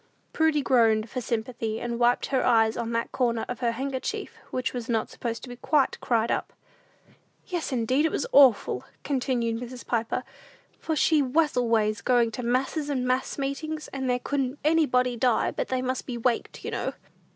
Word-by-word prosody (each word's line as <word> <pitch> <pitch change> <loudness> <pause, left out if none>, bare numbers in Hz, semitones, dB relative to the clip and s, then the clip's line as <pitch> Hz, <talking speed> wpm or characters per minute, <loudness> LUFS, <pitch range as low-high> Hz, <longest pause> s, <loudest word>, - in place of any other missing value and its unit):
Prudy 315 -2 +2
groaned 225 -4 +3
for 255 - -3
sympathy, 225 -1 -3
and 235 0 -3
wiped 240 0 +3
her 260 - +3
eyes 225 -2 +4
on 235 -1 -3
that 230 0 -1
corner 235 -3 0
of 245 - -5
her 235 -2 0
handkerchief 265 +2 -4
which 255 -2 -2
was 240 -2 -4 0.2
supposed 230 -1 -5
to - - -7
be - - -6
not 245 - -15
quite 295 -3 +2
"cried 230 -1 +1
up." - - -2 0.9
"Yes, 350 -5 -3
indeed, 255 +5 +2
it - - -4
was - - -1
awful," 250 - +5 0.2
continued 245 -4 -1
Mrs. 245 0 -8
Piper; 230 -1 -1 0.6
"for 320 - -2
she 310 0 +3
was 295 +4 +1
always 220 -4 +1
going 240 0 +3
to 250 - -5
masses 265 +5 -1
and 260 -3 -1
mass 255 +1 0
meetings; 305 +3 -3
and 265 -1 -3
there 250 - +2
couldn't 270 +1 -2
anybody 265 -6 +3
die 240 0 +2
but - - -3
they 255 -1 -1
must 255 0 -2
be 245 -2 -4
'waked,' 235 0 -1
you - - -3
know." - - -2
250 Hz, 185 wpm, -26 LUFS, 235-270 Hz, 0.9 s, awful